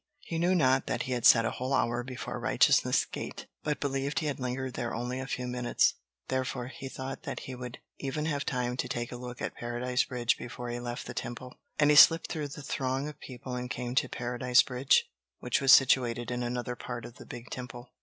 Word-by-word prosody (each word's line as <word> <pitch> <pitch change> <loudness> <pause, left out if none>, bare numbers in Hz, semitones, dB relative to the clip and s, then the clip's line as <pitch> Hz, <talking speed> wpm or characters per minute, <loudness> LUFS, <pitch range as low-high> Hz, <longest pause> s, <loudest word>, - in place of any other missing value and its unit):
He 165 - -4
knew 180 +2 +3
not 135 -5 +3
that 120 - -1
he 130 - -5
had 120 -2 +4
sat 115 -1 +7
a 115 - 0
whole 130 +2 -1
hour 120 +1 +1
before 130 0 -5
Righteousness' - - +3
Gate, - - -7 0.2
but 150 -1 -1
believed 140 0 -2
he 155 - +1
had 145 -2 -2
lingered 130 0 -3
there 120 -3 -3
only 125 +2 -3
a 130 - -5
few 125 -2 -3
minutes; 125 -1 +2 0.3
therefore, 130 -1 -2
he 135 0 -8
thought 130 0 -6
that - - -5
he 130 - -7
would 125 0 -7 0.2
even 150 +2 -2
have 145 -3 -1
time 125 -1 -1
to - - -1
take 120 0 -3
a - - -5
look 125 0 -7
at - - -2
Paradise 120 +2 -1
Bridge 120 -2 0
before 120 0 -6
he 120 0 -3
left 120 0 -5
the 120 - -6
Temple. 120 +2 -6 0.2
And 145 0 +5
he - - +5
slipped 165 +3 +8
through 150 -2 -2
the 145 +1 -9
throng 135 +1 -1
of 150 -1 -9
people 130 0 -8
and 125 0 -4
came 125 -1 -3
to 130 -1 +2
Paradise 125 +1 +3
Bridge, 130 +1 +2 0.3
which 125 +1 0
was 135 -1 +6
situated 120 -3 +5
in 125 0 -2
another 125 0 -2
part 120 -1 -6
of 120 - -11
the - - -11
big 120 0 -9
temple. 125 -1 -7
125 Hz, 225 wpm, -30 LUFS, 120-135 Hz, 0.3 s, slipped